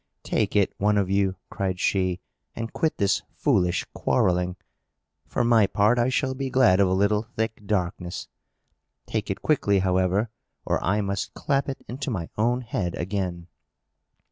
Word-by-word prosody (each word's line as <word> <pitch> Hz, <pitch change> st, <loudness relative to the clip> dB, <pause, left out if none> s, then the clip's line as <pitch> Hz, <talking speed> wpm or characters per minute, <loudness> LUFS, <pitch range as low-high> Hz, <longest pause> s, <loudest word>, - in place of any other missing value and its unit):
"Take 105 Hz, -1 st, 0 dB
it, 100 Hz, -2 st, +3 dB
one 105 Hz, +1 st, +3 dB
of 95 Hz, -2 st, +1 dB
you," 100 Hz, -1 st, +2 dB, 0.2 s
cried 95 Hz, -2 st, -2 dB
she, 95 Hz, -1 st, +1 dB, 0.3 s
"and 115 Hz, 0 st, -5 dB
quit 160 Hz, -, 0 dB
this 100 Hz, 0 st, +2 dB
foolish 95 Hz, -11 st, +1 dB
quarrelling. 90 Hz, 0 st, +1 dB, 0.7 s
For -, -, 0 dB
my 115 Hz, -3 st, +5 dB
part, 105 Hz, +5 st, +3 dB
I 120 Hz, +2 st, +3 dB
shall 130 Hz, 0 st, 0 dB
be 135 Hz, 0 st, -3 dB
glad 125 Hz, -8 st, +4 dB
of 100 Hz, -, +5 dB
a 90 Hz, -, +1 dB
little 100 Hz, +2 st, +2 dB
thick 110 Hz, -2 st, -3 dB
darkness. 90 Hz, -3 st, -2 dB, 0.8 s
Take -, -, -3 dB
it -, -, -3 dB
quickly, 105 Hz, -10 st, +2 dB
however, 95 Hz, +3 st, +1 dB, 0.3 s
or -, -, 0 dB
I 100 Hz, +5 st, +2 dB
must 100 Hz, -1 st, -3 dB
clap 140 Hz, 0 st, 0 dB
it 135 Hz, -, -6 dB
into 135 Hz, +4 st, -4 dB
my 95 Hz, -9 st, -3 dB
own 120 Hz, +3 st, +1 dB
head 100 Hz, -7 st, -3 dB
again!" 90 Hz, -2 st, -3 dB
100 Hz, 160 wpm, -25 LUFS, 95-115 Hz, 0.8 s, my